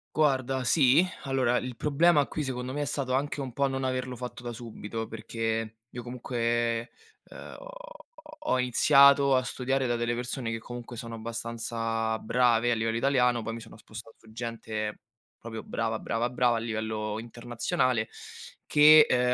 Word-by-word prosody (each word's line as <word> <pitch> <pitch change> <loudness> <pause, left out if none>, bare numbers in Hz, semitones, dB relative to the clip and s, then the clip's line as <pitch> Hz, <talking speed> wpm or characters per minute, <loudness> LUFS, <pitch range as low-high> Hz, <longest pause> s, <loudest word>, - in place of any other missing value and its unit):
Guarda, 135 -3 +1
sì. 135 +5 +5 0.2
Allora, 130 -3 +1
il 125 -1 -4
problema 150 +3 +3
qui 155 - -4
secondo 130 -1 -4
me 145 - -2
è - - 0
stato 130 -1 -2
anche 145 +2 -1
un 130 -3 -5
po' 140 +3 +1
non 135 0 -3
averlo 130 -1 -2
fatto 125 0 -7
da 120 -1 -5
subito, 115 -1 -6
perché 115 0 -3
io 120 - -7
comunque, 120 -1 -1 0.4
uhm, - - -10
ho - - -11 0.6
ho 310 - -11
ho 130 - +3
iniziato 140 +2 +5
a 130 - +1
studiare 130 +1 -1
da 120 - +1
delle 120 0 -1
persone 120 0 -3
che 115 - -2
comunque 120 +1 -8
sono 115 0 -6
abbastanza 115 0 -3
brave 120 0 +2
a - - +2
livello 115 0 -1
italiano, 125 -2 +2
poi 115 +1 -4
mi 115 - -7
sono 110 - -13
spostato 110 +1 -11
su 110 - -18
gente 110 -2 -4 0.4
proprio 110 -1 -7
brava, 115 -1 -2
brava, 115 +2 -1
brava 125 -1 +2
a - - -1
livello 110 -1 -3
internazionale, 120 0 -1 0.6
che, 150 +1 +8
ehm, 125 0 +3
120 Hz, 170 wpm, -28 LUFS, 115-130 Hz, 0.6 s, che